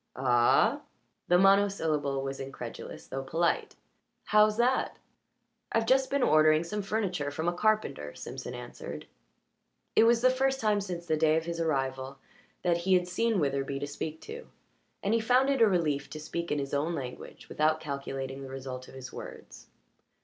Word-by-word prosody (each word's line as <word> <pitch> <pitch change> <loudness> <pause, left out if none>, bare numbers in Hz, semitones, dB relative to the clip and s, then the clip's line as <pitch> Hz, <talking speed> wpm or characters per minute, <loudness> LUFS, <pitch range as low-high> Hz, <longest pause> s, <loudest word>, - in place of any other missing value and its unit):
"Ah?" 120 -2 +3 0.5
The 175 - +5
monosyllable 170 -8 +2
was 135 0 -4
incredulous 135 0 -7
though 135 - -4
polite. 165 +5 0 0.5
"How's 210 0 +4
that?" 250 +2 +1 0.7
"I've 225 0 +1
just 265 +2 +3
been 280 -2 +1
ordering 155 -2 +5
some 210 +5 -3
furniture 195 -8 -1
from 160 +3 -3
a 175 - +2
carpenter," 210 - 0
Simpson - - -7
answered. - - -8 0.9
It 225 - +6
was 230 0 +4
the 255 +1 +5
first 265 +1 +1
time 210 -3 +2
since 175 -3 -5
the 160 -2 +1
day 155 0 +3
of 165 - -2
his 170 0 -4
arrival 135 -4 -1 0.5
that 175 -1 +2
he 185 +2 +2
had 180 0 +2
seen 220 +3 +1
Witherbee 140 -2 -1
to 145 - -3
speak 155 +2 -6
to, 475 +2 -9 0.6
and 200 - +1
he 230 - +3
found 255 +4 +3
it 270 -3 0
a 225 - +8
relief 150 -7 0
to 155 - -7
speak 170 +2 -4
in 150 - +1
his 140 -1 -4
own 155 +4 0
language 130 -4 -7
and - - -20
without 155 +1 +2
calculating 140 -2 -5
the 135 - -8
result 130 -1 -7
of - - -13
his 130 -1 -9
words. - - -10
165 Hz, 175 wpm, -29 LUFS, 140-210 Hz, 0.9 s, a